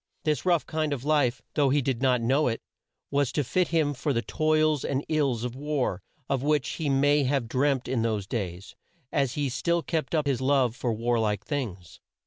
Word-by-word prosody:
This 155 +2 0
rough 170 -3 +3
kind 155 -2 -1
of 130 -3 -5
life, 145 -4 +1
though 145 -3 +3
he 145 +2 +3
did 130 -3 -1
not 125 -3 +3
know 135 +6 +2
it, 115 -2 -2 0.5
was 140 -2 +1
to 150 - +1
fit 175 +8 +1
him 155 -3 +1
for 140 +2 -1
the 115 -1 0
toils 155 +3 +1
and 135 +1 -1
ills 140 -7 +1
of 125 0 -4
war, 140 -9 -1 0.3
of 135 -2 0
which 150 -1 +1
he 155 -3 -2
may 145 +2 +3
have 135 -3 0
dreamt 130 +1 +1
in 125 -2 0
those 110 -3 -1
days, 95 -4 -5 0.4
as 140 -5 +1
he 145 -1 0
still 170 +6 0
kept 160 -3 -2
up 155 -1 +1
his 135 -3 0
love 130 -3 +2
for 125 -1 -1
war 115 +2 0
like 105 -2 -1
things. 95 - -5
135 Hz, 205 wpm, -27 LUFS, 120-150 Hz, 0.5 s, rough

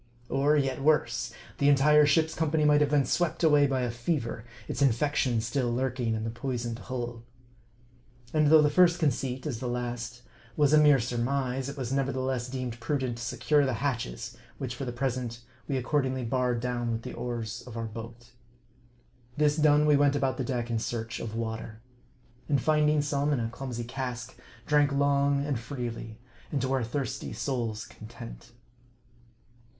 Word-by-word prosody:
Or 145 +2 +3
yet 135 -1 0
worse, 150 +2 +2 0.3
the 140 - +4
entire 150 +2 +6
ship's 160 +1 +3
company 155 -1 +1
might 150 0 +5
have 145 - +3
been 145 -2 +3
swept 170 +5 0
away 150 -3 +5
by 135 -1 0
a 120 -1 -1
fever, 120 -2 -2 0.2
its - - -4
infection 130 -2 +2
still 120 +1 -1
lurking 125 -2 -1
in 110 - -3
the 115 - -3
poisoned 120 -1 -4
hull. 120 -1 -5 1.1
And 155 -1 +4
though 155 0 +7
the 150 - +3
first 175 +2 +5
conceit, 135 -4 -1
as 130 -7 -3
the 125 - -3
last, 120 0 -4 0.3
was 150 -1 +4
a 155 - +8
mere 150 -2 +6
surmise, 125 +2 -1
it 140 - -7
was 130 -2 -3
nevertheless 130 -2 -1
deemed 125 -2 -4
prudent 125 -1 -2
to - - -5
secure 145 +4 +2
the 130 -3 0
hatches, 120 - -3 0.2
which 130 -2 -4
for 135 +3 -5
the 120 - -3
present 120 -2 -3 0.3
we 135 - 0
accordingly 130 -1 0
barred 125 0 0
down 120 -1 -1
with 115 0 -3
the - - -6
oars 115 -4 -4
of 120 -2 -8
our 115 - -2
boat. 115 +2 -9 1.1
This 150 -1 +3
done, 150 -1 +4
we 150 -1 +5
went 145 0 +3
about 135 -2 0
the 130 - -1
deck 120 -1 -2
in 115 - +1
search 115 0 -4
of 110 -1 -5
water. 110 -1 -4 0.7
And 140 -2 +3
finding 150 +1 +3
some 145 0 0
in 135 - +1
a 115 -1 -1
clumsy 125 -1 -5
cask, 125 0 -5 0.3
drank 145 -1 +3
long 140 0 +2
and 140 -5 -1
freely, 120 -3 -6 0.3
and 145 - 0
to 130 0 0
our 130 -2 +1
thirsty 125 0 -3
souls' 115 -2 -2
content. 115 +2 -11
130 Hz, 175 wpm, -28 LUFS, 120-145 Hz, 1.1 s, a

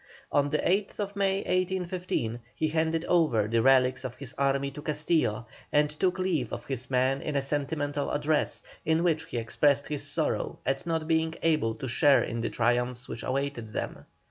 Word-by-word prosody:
On 145 0 +2
the 150 - +1
8th 200 +2 -1
May, 195 -1 +1
1815, 180 -9 -1 0.2
he 155 - 0
handed 160 +1 0
over 150 -12 +3
the 115 +1 +2
relics 130 0 +4
of 130 -2 -5
his 140 -2 -7
army 140 0 +1
to 150 - -8
Castillo, 150 -7 0 0.3
and 150 0 +3
took 180 +5 0
leave 170 - 0
of - - -5
his 130 -2 -4
men 130 +1 +2
in 150 - -3
a 140 - +2
sentimental 145 0 -1
address, 150 +1 0 0.2
in 160 +1 +2
which 165 -3 +1
he - - -5
expressed 140 +5 +2
his 150 -2 -2
sorrow - - -1
at 135 +5 -1
not 160 -1 -1
being 160 0 +1
able 155 -9 +2
to 130 - -5
share 140 +3 +4
in 115 0 -3
the 115 - -1
triumphs 120 +1 0
which 115 - -6
awaited 135 -3 -2
them. 110 - -5
145 Hz, 180 wpm, -28 LUFS, 125-160 Hz, 0.3 s, relics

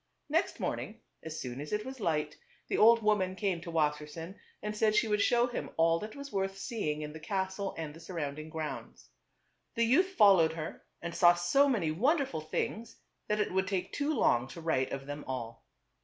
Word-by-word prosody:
Next 325 +5 +1
morning - - -3 0.2
as 160 0 -6
soon 125 +1 -5
as 150 - -7
it 210 +1 -1
was 260 0 -7
light, 155 -5 0 0.3
the - - 0
old 230 +1 +7
woman 195 -3 +2
came 190 -4 -1
to 170 - -7
Wassersein 150 +2 -1 0.3
and 210 0 -3
said 215 0 +2
she 225 +2 +3
would 210 -1 +1
that 215 -5 +1
was 280 -1 -8
worth 195 -1 -1
seeing 155 - -3
in 150 0 -6
the 160 - -8
castle 190 +3 -2
and 155 -2 -5
the 165 - -12
surrounding 155 -3 -5
grounds. 150 - -6 0.6
The 230 - +2
youth 305 +11 +4
fol 200 - +7
lowed 160 -1 +3
her 160 -1 -6 0.2
and 170 0 -4
saw 175 0 +6
so 225 +12 +3
many 190 - +1
wonderful 260 - +1
things 220 +8 -4 0.3
that 210 0 0
it 210 - 0
would 190 0 +1
take 190 -2 -2
too 290 +1 0
long 120 - +3
to 165 +5 -9
write 145 -5 0
of 135 0 -4
them 145 +1 -6
all. 115 -3 -6
180 Hz, 190 wpm, -31 LUFS, 155-215 Hz, 0.6 s, old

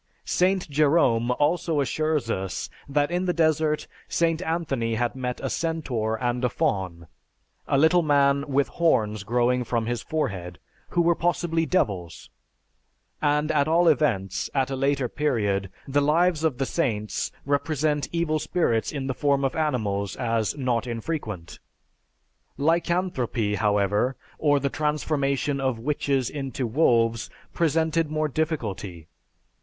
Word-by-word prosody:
Saint 185 +1 +1
Jerome 140 -5 +3
also 150 +4 +1
assures 150 -3 0
us 95 -2 -3 0.2
that 145 +2 +1
in 180 +1 0
the 180 - +1
desert 155 -1 +2 0.2
St. 165 0 +1
Anthony 140 -10 -1
had 120 +1 0
met 125 -1 -3
a - - 0
centaur 135 -10 -1
and 120 0 -1
a 125 - +3
faun, 90 -6 -2 0.6
a 140 - +2
little 160 +5 +5
man 140 -2 +3
with 140 0 +1
horns 110 - +1
growing 125 +3 +1
from 115 -1 -1
his 120 0 -2
forehead, 95 - -3 0.3
who 175 - +2
were 170 +1 +4
possibly 165 -1 0
devils, 95 - -1 0.9
and 150 +1 +2
at 145 -1 +2
all 170 +2 +3
events, 95 - +1
at 135 -1 +1
a - - -1
later 135 -1 +1
period, 105 -10 0 0.2
the 145 +1 +2
"Lives 160 +2 +2
of 155 -6 +1
the 135 - 0
Saints" 110 -10 -1
represent 145 +1 0
evil 165 -2 0
spirits 120 -10 0
in 140 -3 -4
the 135 - -1
form 140 +1 +1
of 135 - -1
animals 110 -10 -1
as 115 0 -1
not 125 -2 0
infrequent. 115 - -5 1.0
Lycanthropy, 160 - 0
however, 105 +4 +1 0.2
or 145 -2 +3
the 140 - 0
transformation 145 -2 -1
of 130 -3 0
witches 135 0 0
into 135 -2 -4
wolves, 115 -3 +2 0.2
presented 160 0 +1
more 155 0 0
difficulty. 105 - -3
140 Hz, 135 wpm, -25 LUFS, 115-155 Hz, 1.0 s, little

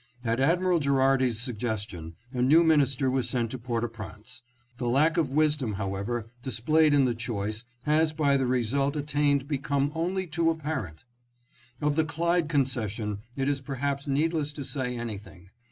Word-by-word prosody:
At 115 0 0
Admiral 175 +5 +3
Gherardi's 135 -4 +2
suggestion 105 -9 -4 0.2
a 125 - -1
new 155 +7 +6
minis 145 -5 +3
ter 135 - 0
was 130 -1 +1
sent 120 -3 -1
to 130 - -5
Port 120 -1 -2
au - - +1
Prince.... 110 -2 -9 0.4
The 120 -2 -1
lack 155 +6 +3
of 160 -6 +1
wisdom, 150 -6 +1
however, 100 +4 -3 0.2
displayed 145 +5 +3
in 140 -2 +5
the 125 - +1
choice... 110 -1 -4 0.2
has 155 +1 +3
by 150 -3 +2
the 135 -2 +1
result 130 +4 +1
attained 145 -2 +1
become 140 0 0
only 180 +3 -1
too 165 0 +1
apparent." 150 - -3 0.4
" 120 0 -31
Of 150 -1 +2
the 160 - +3
Clyde 165 +1 0
concession 115 -8 -1 0.2
it 135 0 -1
is 140 -1 0
perhaps 140 +1 -3
needless 150 +1 0
to 145 - -6
say 125 -3 -3
anything 100 -5 -7
135 Hz, 170 wpm, -27 LUFS, 120-150 Hz, 0.4 s, new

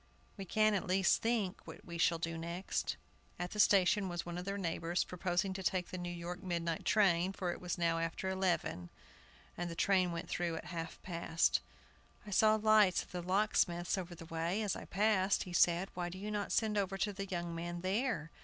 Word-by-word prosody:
We 195 - -6
can, 215 +3 +3
at 195 - -1
least, 190 +1 +3
think 225 -5 0
what - - -10
we 170 -1 -7
shall 170 0 +3
do 165 0 -3
next." 170 +3 -3 0.4
At 175 0 -4
the 210 - -6
station 195 -1 +4
was 175 -1 -4
one 175 0 -4
of 180 - -6
their 200 +1 -2
neighbors, 170 -1 -1
proposing 180 +1 -1
to 190 - -5
take 180 0 0
the 185 - -4
New 175 0 -4
York 175 +1 -6
midnight 170 -3 -2
train, 190 -3 +3
for 180 -2 -2
it - - -7
was 180 -1 -3
now 165 -1 +1
after 165 +3 -3
eleven, 180 - -1 0.7
and 175 0 -3
the 165 - -6
train 185 0 +3
went 170 0 -4
through 170 -1 -1
at - - -6
half 165 -2 -5
past. 170 -2 +1 0.6
"I 210 - -8
saw 215 +2 +5
lights 215 -3 +4
at - - -18
the 180 - -4
locksmith's 180 -2 +1
over 180 -2 -5
the 165 - -10
way, 165 +6 -1
as 205 - 0
I - - -7
passed," 200 -1 +2
he 180 - -9
said; 175 +2 +3
"why 175 -1 -3
do 190 +4 -6
not 205 -1 -1
you - - -18
send 215 -2 +1
over 195 -1 -1
to 205 +1 0
the 195 0 -5
young 175 -2 -3
man 175 +1 -4
there? 195 - -1
180 Hz, 210 wpm, -34 LUFS, 170-195 Hz, 0.7 s, saw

